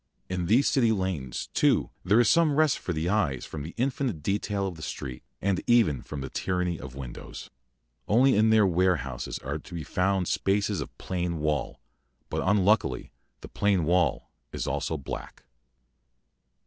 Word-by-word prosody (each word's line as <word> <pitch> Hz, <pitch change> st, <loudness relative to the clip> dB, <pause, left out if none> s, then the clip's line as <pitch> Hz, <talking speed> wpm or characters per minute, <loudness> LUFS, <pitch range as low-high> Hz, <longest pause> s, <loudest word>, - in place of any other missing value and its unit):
In 90 Hz, -2 st, -2 dB
these 120 Hz, +8 st, +4 dB
City 120 Hz, -4 st, +3 dB
lanes, 95 Hz, -, -2 dB
too, -, -, +2 dB
there 105 Hz, +6 st, +4 dB
is 120 Hz, -, +5 dB
some 155 Hz, +4 st, +4 dB
rest 155 Hz, -2 st, +3 dB
for -, -, -4 dB
the 80 Hz, 0 st, -1 dB
eyes 90 Hz, -, 0 dB
from 75 Hz, -, -7 dB
the 80 Hz, +4 st, -8 dB
infinite 125 Hz, -, -1 dB
detail 100 Hz, +1 st, -1 dB
of 95 Hz, -, -3 dB
the 80 Hz, -, -12 dB
street, 65 Hz, -4 st, -6 dB, 0.2 s
and 100 Hz, -1 st, +1 dB
even 110 Hz, -, +4 dB
from 75 Hz, -2 st, -7 dB
the 65 Hz, -, -5 dB
tyranny 90 Hz, -2 st, -1 dB
of 65 Hz, 0 st, -9 dB
windows. 65 Hz, -3 st, -8 dB, 0.6 s
Only 130 Hz, +5 st, +4 dB
in 110 Hz, +2 st, +4 dB
their 110 Hz, -2 st, +5 dB
warehouses 85 Hz, -8 st, 0 dB
are 70 Hz, +3 st, -4 dB
to 85 Hz, -, -11 dB
be 80 Hz, -, -4 dB
found 95 Hz, +4 st, 0 dB
spaces 100 Hz, -2 st, 0 dB
of -, -, -8 dB
plain 90 Hz, -2 st, -2 dB
wall, 75 Hz, -1 st, -1 dB, 0.5 s
but -, -, -1 dB
unluckily 95 Hz, -, +2 dB, 0.3 s
the -, -, -8 dB
plain 100 Hz, -5 st, +1 dB
wall 90 Hz, +2 st, +1 dB, 0.2 s
is -, -, -3 dB
also 80 Hz, -, -2 dB
black. 70 Hz, -, -7 dB
90 Hz, 165 wpm, -27 LUFS, 75-105 Hz, 0.6 s, is